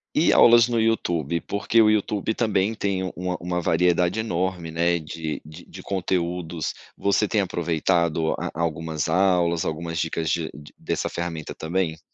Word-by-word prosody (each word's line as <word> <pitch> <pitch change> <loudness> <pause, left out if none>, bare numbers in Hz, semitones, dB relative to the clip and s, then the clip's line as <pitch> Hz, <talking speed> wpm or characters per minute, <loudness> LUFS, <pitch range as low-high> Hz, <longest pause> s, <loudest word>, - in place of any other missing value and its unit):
E - - +4
aulas 120 0 +7
no 120 -2 +1
YouTube, 85 -8 0
porque 100 +3 0
o 105 - +5
YouTube 105 0 0
também 110 -2 +1
tem 100 -3 -1
uma 90 0 -3
uma 90 0 -2
variedade 90 +3 +2
enorme, 90 -5 -2
né, 85 +1 +2
de 80 0 -5
de 80 +3 -12
de - - -11
conteúdos, 90 -3 -2 0.2
você 100 +1 +2
tem 105 -1 +1
aproveitado 85 -2 0
a - - -4
a - - -6
algumas 80 -1 -2
aulas, 85 -1 +2
algumas 85 +1 -3
dicas 80 0 -2
de 80 0 0
de 75 +1 -13
dessa - - -2
ferramenta 85 -3 -5
também? 80 -1 -2
85 Hz, 160 wpm, -24 LUFS, 80-95 Hz, 0.2 s, aulas